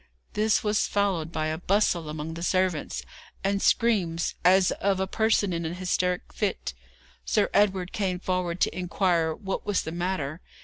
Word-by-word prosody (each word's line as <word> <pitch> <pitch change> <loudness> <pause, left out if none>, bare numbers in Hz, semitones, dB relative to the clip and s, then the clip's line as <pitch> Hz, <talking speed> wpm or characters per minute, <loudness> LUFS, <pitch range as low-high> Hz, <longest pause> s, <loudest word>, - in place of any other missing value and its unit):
This 215 0 +2
was 210 0 +1
followed 190 -6 0
by 155 -2 -1
a 160 0 -3
bustle 180 -4 +1
among 155 +1 -5
the 165 - -7
servants, 185 -2 0 0.4
and 195 0 +1
screams 185 -8 +2
as 185 +1 +5
of 195 -1 0
a 190 - +1
person 215 -1 +1
in 170 0 -2
an 165 +2 -3
hysteric 180 0 0
fit. - - -2 0.5
Sir 65 -1 +1
Edward 190 -3 +2
came 185 -3 -1
forward 180 -1 -1
to - - +2
inquire 175 -2 +1
what 195 -2 -4
was 205 -2 0
the 160 - -5
matter. 170 -3 -2
180 Hz, 165 wpm, -27 LUFS, 170-195 Hz, 0.5 s, as